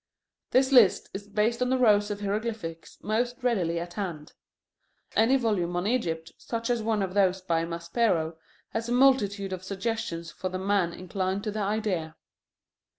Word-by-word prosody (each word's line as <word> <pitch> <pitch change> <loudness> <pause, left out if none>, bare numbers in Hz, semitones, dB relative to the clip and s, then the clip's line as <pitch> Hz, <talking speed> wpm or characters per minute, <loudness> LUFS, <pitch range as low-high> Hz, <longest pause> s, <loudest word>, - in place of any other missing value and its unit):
This 260 +1 +3
list 240 -7 +5
is 200 +1 -6
based 220 +4 0
on 250 - +2
the 260 - +2
rows 210 -4 +4
of 205 0 -4
hieroglyphics 205 -5 -4
most 240 +4 -1
readily 180 -9 +1
at 175 +1 -6
hand. 175 -7 -5 0.8
Any 240 +5 +5
volume 200 -8 0
on 175 +1 -1
Egypt, 165 -9 -1
such 230 0 -3
as 240 -2 0
one 215 -2 0
of 185 -1 -3
those 190 -2 +3
by 165 -3 0
Maspero, 170 0 0 0.3
has 225 +1 -3
a - - +1
multitude 205 -7 +3
of 185 0 -6
suggestions 195 -4 -3
for 185 +4 -4
the 185 - -3
man 190 -2 +1
inclined 185 +2 -3
to 215 - -2
the 215 - -4
idea. 195 -6 -1
200 Hz, 165 wpm, -27 LUFS, 175-230 Hz, 0.8 s, list